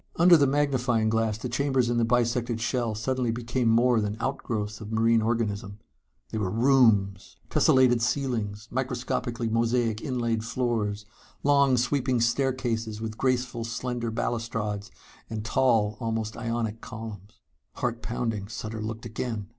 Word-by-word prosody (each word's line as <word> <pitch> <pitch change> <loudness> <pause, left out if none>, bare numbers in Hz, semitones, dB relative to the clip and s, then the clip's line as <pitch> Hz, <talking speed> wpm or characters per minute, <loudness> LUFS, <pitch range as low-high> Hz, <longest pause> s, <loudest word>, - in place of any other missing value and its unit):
Under 175 0 +7
the 145 -3 +4
magnifying 130 -5 +1
glass 110 -1 +1
the 120 - -5
chambers 130 0 +1
in 120 0 0
the - - +3
bisected 120 0 +1
shell 115 -1 -1
suddenly 125 +2 -1
became 120 +1 -1
more 120 0 +4
than 105 +1 -2
outgrowths 110 -5 -3
of 105 0 -7
marine 115 0 +3
organism. 110 -3 -1 0.5
They 110 - -2
were 100 -3 -1
rooms! 110 -5 +3 0.2
Tessellated 125 -2 +4
ceilings, 115 -5 -1
microscopically 125 -2 -2
mosaic 115 -1 +1
inlaid 120 -5 -1
floors, 110 -4 -1 0.4
long 140 -2 +4
sweeping 125 0 +1
staircases 115 -3 0
with 110 -1 -5
graceful 125 -2 0
slender 120 +1 -3
balustrades 110 -3 -3 0.4
and 110 -1 -5
tall 110 -3 +2
almost 110 -2 -2
Ionic 115 -1 -3
columns.... 105 -3 -9 0.3
Heart 120 -2 -2
pounding, 115 -4 -3
Sutter 110 0 -6
looked 110 +2 -5
again. 110 -2 -4
115 Hz, 135 wpm, -27 LUFS, 110-125 Hz, 0.5 s, Under